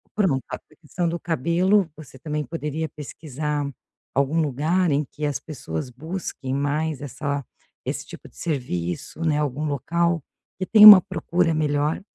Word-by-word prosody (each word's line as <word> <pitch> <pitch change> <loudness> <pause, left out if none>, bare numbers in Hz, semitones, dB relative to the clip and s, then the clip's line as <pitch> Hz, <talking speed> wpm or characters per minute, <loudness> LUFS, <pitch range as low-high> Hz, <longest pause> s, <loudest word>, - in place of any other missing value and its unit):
Pra 205 -2 +3
montar 135 -5 -2 0.2
pensando 170 +2 -2
cabelo, 170 +5 +1
você 135 -4 -13
também 150 +2 -3
poderia 155 +2 -4
pesquisar 150 0 -4 0.5
algum 140 +4 +2
lugar 155 +5 +1
em 145 +1 +1
que 150 - -6
as 145 -1 -1
pessoas 125 - -6
busquem 140 0 -5
mais 145 +1 -1
essa, 140 0 -4 0.4
esse - - -3
tipo - - -12
de - - -24
serviço, 105 - -3
né. 150 -2 +2
Algum 150 0 -2
local 165 +3 0 0.4
que 185 - -1
tenha 215 +1 +9
uma 200 -3 +13
procura 175 -2 0
melhor 150 0 0
150 Hz, 145 wpm, -23 LUFS, 140-170 Hz, 0.5 s, uma